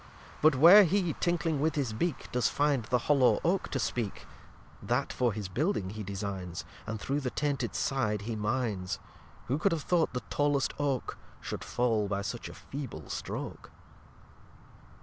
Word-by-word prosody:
But 155 -2 +6
where 175 +10 +9
he, 180 -2 +1
tinkling 165 -4 0
with 160 +1 +1
his 135 -7 -1
Beak, 165 +6 -2
Does 125 -1 +2
find 145 -5 +1
the 125 - +2
hollow 135 -4 +4
Oak 180 +3 +1
to - - -2
speak, 115 -3 -2 0.6
That - - -1
for 125 -2 +1
his 105 -2 -4
building 105 - -1
he 110 +1 -6
designs, 95 -3 -5 0.2
And 110 0 -3
through 140 +7 -1
the 130 -3 -2
tainted 140 -4 -1
Side 110 -7 0
he 115 +1 -3
mines. 105 -4 -1 0.5
Who 135 +4 -1
could 195 +4 +2
have 165 -3 -1
thought 175 -3 +2
the 125 - -3
tallest 145 -1 +1
Oak 140 -3 -1 0.2
Should - - -5
fall 115 -4 +1
by 100 0 -2
such 105 +4 -5
a - - -10
feeble 130 - -7
Stroke! - - -5
130 Hz, 165 wpm, -30 LUFS, 105-150 Hz, 0.6 s, where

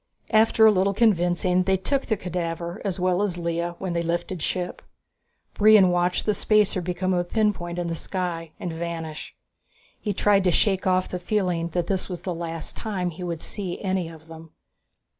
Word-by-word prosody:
After 220 0 +5
a 220 - +8
little 195 0 +1
convincing 180 -4 +3
they 190 +1 +2
took 275 +8 -1
the 220 - +1
cadaver, 170 0 -4
as 195 -3 -2
well 180 +1 +2
as 195 -4 -1
Lea, 170 0 -2
when 185 -2 -3
they 170 - 0
lifted 170 +1 -2
ship. 180 +2 -3 0.7
Brion 210 -3 +6
watched 175 0 +1
the 210 - +2
spacer 210 -2 +2
become 180 +1 -1
a 175 -1 +1
pinpoint 175 -3 -1
in 175 - -1
the 170 - -2
sky 170 -1 -3
and 175 -2 -4
vanish. 165 -2 -5 0.6
He 210 - -2
tried 200 0 +3
to - - +5
shake 190 +1 +1
off 185 0 +2
the 180 - -4
feeling 180 -3 0
that 175 - +1
this 190 +1 -2
was 180 -2 -5
the 180 - -3
last 165 -1 -5
time 190 -5 -3
he 175 +3 -8
would 170 -2 -4
see 190 -4 -4
any 185 -4 -1
of 160 -1 -13
them. 165 0 -12
180 Hz, 185 wpm, -25 LUFS, 170-195 Hz, 0.7 s, a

